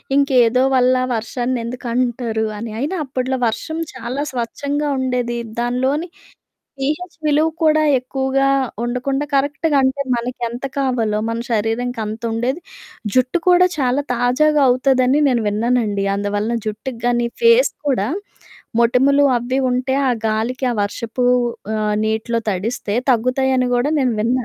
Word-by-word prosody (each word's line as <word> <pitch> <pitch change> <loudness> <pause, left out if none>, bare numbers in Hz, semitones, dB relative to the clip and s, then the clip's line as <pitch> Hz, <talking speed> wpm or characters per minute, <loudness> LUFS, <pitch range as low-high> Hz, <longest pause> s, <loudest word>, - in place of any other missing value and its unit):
ఇంకేదో 255 -3 +4
వల్ల 255 0 +4 0.2
వర్షాన్నెందుకంటారు 240 0 -2
అని. 225 +2 -5
అయినా 295 +9 -2
అప్పుడ్లో 260 0 -2
వర్షం 315 +8 -3 0.2
చాలా 255 +2 -4
స్వచ్ఛంగా 280 +4 -2
ఉండేది. 250 -2 -1 0.2
దానిలోని 260 +7 0 0.7
పీహెచ్ 310 +6 -3
విలువ 300 +2 +3
కూడా 310 -1 +4 0.2
ఎక్కువుగా 265 +1 0 0.4
ఉండకుండా 255 +4 -1
కరెక్ట్‌గా 290 +2 +1
అంటే, 265 +2 +1
మనకెంత 240 +1 -4
కావాలో, 235 -6 0
మన 230 0 -2
శరీరానికంతుండేది. 230 +3 -2 0.5
జుట్టు 255 +6 +2
కూడా 360 0 +6
చాలా 260 +1 +1
తాజాగవుతదని 260 +1 +3
నేను 240 -4 +1
విన్నానండి. 215 -1 0
అందువలన 205 +3 -1
జుట్టుకు 225 +3 -5
గానీ, 240 -1 +1
ఫేస్ 465 +1 +5 0.2
కూడా 215 -6 +1 0.7
మొటిమలు 265 +4 +4
అవి 255 +3 -2
ఉంటే, 255 +1 0
ఆ - - +3 0.2
గాలికి, 230 +5 -1
ఆ - - -4
వర్షపూ 230 +4 -3 0.5
ఆహ్, 210 -1 0
నీటిలో 220 +2 -1
తడిస్తే 205 +2 -2 0.2
తగ్గుతాయని 255 +2 +1
గూడా 265 +5 +1
నేను 250 -3 +1
విన్నా. 245 +3 +1
250 Hz, 115 wpm, -19 LUFS, 230-270 Hz, 0.7 s, కూడా